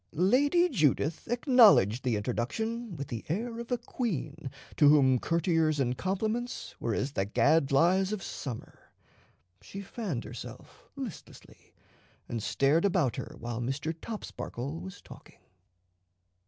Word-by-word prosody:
Lady 285 Hz, -, +3 dB
Judith 155 Hz, -, +1 dB
acknowledged 230 Hz, -, +5 dB
the 125 Hz, -3 st, +1 dB
introduction 200 Hz, -, -3 dB
with 140 Hz, -1 st, -5 dB
the 115 Hz, -2 st, -5 dB
air 230 Hz, +7 st, -2 dB
of 235 Hz, +1 st, -8 dB
a 245 Hz, -, +2 dB
queen 190 Hz, -, -4 dB, 0.3 s
to 145 Hz, -, +6 dB
whom 135 Hz, -4 st, +5 dB
courtiers 165 Hz, -1 st, +1 dB
and 125 Hz, -2 st, +1 dB
compliments 215 Hz, -, -3 dB
were 115 Hz, -2 st, -1 dB
as 135 Hz, -, -1 dB
the 95 Hz, -, 0 dB
gadflies 155 Hz, -, +3 dB
of 210 Hz, -4 st, -3 dB
summer. 125 Hz, -6 st, -7 dB, 0.8 s
She 195 Hz, -, -8 dB
fanned 195 Hz, -, -4 dB
herself -, -, -10 dB
listlessly, -, -, -10 dB, 0.5 s
and 115 Hz, -2 st, -3 dB
stared 140 Hz, +9 st, +2 dB
about 175 Hz, -, +2 dB
her -, -, -6 dB
while 120 Hz, 0 st, -5 dB
Mr. 135 Hz, +6 st, -2 dB
Topsparkle 160 Hz, -, -6 dB
was 190 Hz, -1 st, -9 dB
talking. -, -, -14 dB
165 Hz, 125 wpm, -29 LUFS, 130-215 Hz, 0.8 s, to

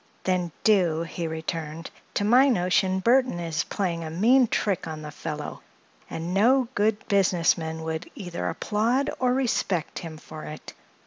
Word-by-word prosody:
"Then 180 Hz, -2 st, 0 dB
do," 175 Hz, -7 st, +3 dB
he 170 Hz, 0 st, -4 dB
returned. 160 Hz, 0 st, -5 dB, 0.2 s
"To -, -, +1 dB
my 255 Hz, +6 st, +6 dB
notion 185 Hz, -3 st, +2 dB
Burthon 250 Hz, -4 st, +3 dB
is 165 Hz, -3 st, -2 dB
playing 175 Hz, -5 st, -2 dB
a 160 Hz, -, -5 dB
mean 235 Hz, +10 st, +4 dB
trick 195 Hz, -6 st, -1 dB
on 155 Hz, -1 st, -6 dB
the 150 Hz, -, -7 dB
fellow, 150 Hz, -1 st, -6 dB, 0.5 s
and 165 Hz, +2 st, -4 dB
no 245 Hz, +6 st, +4 dB
good 210 Hz, -1 st, 0 dB
business 190 Hz, -4 st, +3 dB
man 160 Hz, -1 st, -5 dB
would 160 Hz, 0 st, -4 dB
either 175 Hz, -4 st, -4 dB
applaud 230 Hz, +6 st, 0 dB
or 250 Hz, -1 st, +2 dB
respect 230 Hz, -10 st, 0 dB
him 160 Hz, -2 st, -8 dB
for 155 Hz, 0 st, -10 dB
it. 150 Hz, 0 st, -9 dB
180 Hz, 155 wpm, -26 LUFS, 160-215 Hz, 0.5 s, my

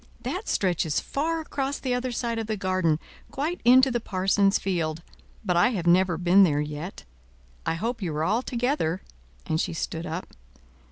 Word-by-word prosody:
"That 385 Hz, +5 st, -4 dB
stretches 175 Hz, -5 st, +1 dB
far 325 Hz, +3 st, -2 dB
across 280 Hz, -2 st, -3 dB
the 255 Hz, -2 st, -2 dB
other 250 Hz, +1 st, -1 dB
side 235 Hz, -1 st, -2 dB
of 220 Hz, -, -4 dB
the 215 Hz, -1 st, -2 dB
garden, 185 Hz, -5 st, +1 dB, 0.3 s
quite 310 Hz, +6 st, -3 dB
into 260 Hz, +2 st, +6 dB
the 240 Hz, -, 0 dB
parson's 195 Hz, -1 st, +2 dB
field; 165 Hz, -4 st, -2 dB, 0.4 s
but 180 Hz, -3 st, +1 dB
I 175 Hz, -, +5 dB
have 180 Hz, -5 st, -3 dB
never 175 Hz, 0 st, +4 dB
been 180 Hz, +3 st, +5 dB
there 150 Hz, -6 st, +4 dB
yet. 150 Hz, +5 st, -5 dB, 0.6 s
I -, -, +1 dB
hope 230 Hz, +7 st, -3 dB
you 175 Hz, -4 st, -2 dB
are 155 Hz, -, 0 dB
all 215 Hz, +8 st, +2 dB
together," 245 Hz, -, -1 dB, 0.4 s
and 160 Hz, 0 st, 0 dB
she -, -, -2 dB
stood 165 Hz, +1 st, -4 dB
up. 165 Hz, +4 st, -5 dB
195 Hz, 175 wpm, -26 LUFS, 170-245 Hz, 0.6 s, into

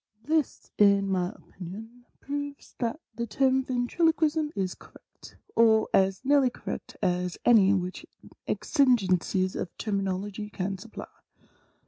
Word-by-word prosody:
This, 310 Hz, +2 st, -1 dB
in 200 Hz, -1 st, +5 dB
my 180 Hz, -1 st, +1 dB
opinion, 220 Hz, +5 st, -11 dB, 0.2 s
proves 285 Hz, 0 st, -6 dB
that 235 Hz, +4 st, -2 dB
the 235 Hz, +2 st, -4 dB
term 265 Hz, +4 st, +2 dB
Ventriloquism 305 Hz, +4 st, +1 dB
is 190 Hz, -2 st, -1 dB
cor -, -, -18 dB
rect, -, -, -16 dB, 0.2 s
or 220 Hz, -1 st, +4 dB
as 190 Hz, +5 st, +2 dB
nearly 280 Hz, -2 st, +4 dB
correct -, -, -7 dB
as 180 Hz, 0 st, 0 dB
any 210 Hz, -5 st, +6 dB
which 180 Hz, -1 st, -4 dB, 0.2 s
the -, -, -16 dB, 0.2 s
exigencies 190 Hz, -, +2 dB
of -, -, -3 dB
termin 195 Hz, -3 st, -1 dB
ology 205 Hz, +3 st, -5 dB
can 195 Hz, -1 st, -3 dB
supply. 220 Hz, +4 st, -9 dB
220 Hz, 130 wpm, -27 LUFS, 190-265 Hz, 0.2 s, any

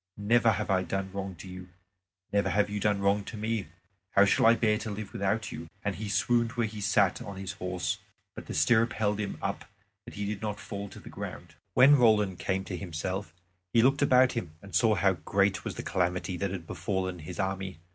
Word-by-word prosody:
Never 115 Hz, +2 st, +4 dB
have 105 Hz, +1 st, -2 dB
I 95 Hz, -1 st, +3 dB
done 95 Hz, +1 st, -3 dB
wrong 95 Hz, -1 st, -5 dB
to 85 Hz, -, -11 dB
you; 90 Hz, 0 st, -9 dB, 0.6 s
never 100 Hz, 0 st, +2 dB
have 105 Hz, 0 st, +1 dB
you 105 Hz, -, -2 dB
done 105 Hz, -1 st, +1 dB
wrong 100 Hz, +1 st, +2 dB
to 115 Hz, -, -7 dB
me. 110 Hz, -3 st, -2 dB, 0.5 s
How 100 Hz, -, +6 dB
shall 100 Hz, -, +4 dB
I 115 Hz, -, +7 dB
bear 105 Hz, -2 st, +2 dB
to 110 Hz, -, -5 dB
live 105 Hz, -1 st, -6 dB
without 100 Hz, +3 st, -1 dB
you?" 80 Hz, 0 st, -7 dB, 0.2 s
And 100 Hz, -, +1 dB
he 110 Hz, -1 st, -4 dB
swooned 115 Hz, +3 st, +2 dB
where 120 Hz, -2 st, 0 dB
he 105 Hz, -1 st, -6 dB
sat 100 Hz, -1 st, +2 dB
on 100 Hz, -1 st, -7 dB
his 95 Hz, -1 st, -4 dB
horse. 90 Hz, +1 st, -3 dB, 0.3 s
But -, -, -9 dB
the -, -, -5 dB
stirrup 115 Hz, 0 st, +3 dB
held 105 Hz, -1 st, 0 dB
him 100 Hz, -2 st, -3 dB
up -, -, -2 dB, 0.4 s
that -, -, -10 dB
he 105 Hz, -, -3 dB
did 100 Hz, -1 st, -3 dB
not 105 Hz, -1 st, -3 dB
fall 100 Hz, -1 st, -6 dB
to -, -, -11 dB
the -, -, -11 dB
ground. -, -, -7 dB, 0.2 s
When 135 Hz, +4 st, +8 dB
Roland 105 Hz, -6 st, +3 dB
came 95 Hz, 0 st, -1 dB
to 95 Hz, -, -5 dB
himself 95 Hz, +2 st, -4 dB, 0.4 s
he 115 Hz, -, +5 dB
looked 135 Hz, +3 st, +3 dB
about 130 Hz, -2 st, +5 dB
him 85 Hz, -10 st, -5 dB
and 100 Hz, +2 st, -13 dB
saw 110 Hz, -3 st, +4 dB
how 95 Hz, 0 st, +3 dB
great 100 Hz, +3 st, +1 dB
was -, -, -4 dB
the -, -, -5 dB
calamity 90 Hz, 0 st, -1 dB
that 100 Hz, +3 st, -1 dB
had 90 Hz, -3 st, -5 dB
befallen 95 Hz, +1 st, -3 dB
his 75 Hz, -, -8 dB
army. 95 Hz, -2 st, -2 dB
100 Hz, 220 wpm, -29 LUFS, 95-110 Hz, 0.6 s, When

